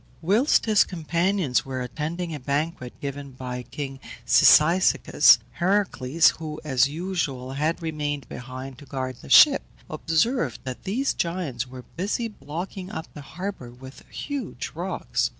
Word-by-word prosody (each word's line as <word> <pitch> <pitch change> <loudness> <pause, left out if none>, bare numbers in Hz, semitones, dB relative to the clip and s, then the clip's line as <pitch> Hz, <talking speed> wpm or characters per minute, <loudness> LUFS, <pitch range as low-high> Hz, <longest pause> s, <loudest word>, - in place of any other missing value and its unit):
Whilst 210 - +3
his 215 -2 +5
companions 170 -3 0
were 130 -1 -5
attending 160 +7 -4
a 150 - -5
banquet 140 -1 -3
given 140 -1 -6
by 125 -1 -5
king 135 +1 -7 0.3
Cyzicus, 165 +8 +6
Heracles, 175 -6 +2
who, 155 -1 -6
as 135 -3 +3
usual, 150 -6 -3
had 155 +4 -1
remained 145 -4 -3
behind 130 +1 -8
to 145 - -14
guard 130 -2 -4
the 70 - -13
ship, - - +8 0.3
observed 225 +11 0
that 130 -2 -7
these 250 +9 0
Giants 165 -8 -2
were 125 0 -10
busy 205 +6 -1
blocking 185 0 -7
up 165 -5 -7
the 150 - -9
harbour 180 -3 -6
with 130 +2 -13
huge 285 -2 -5
rocks. - - -2
150 Hz, 135 wpm, -25 LUFS, 130-180 Hz, 0.3 s, ship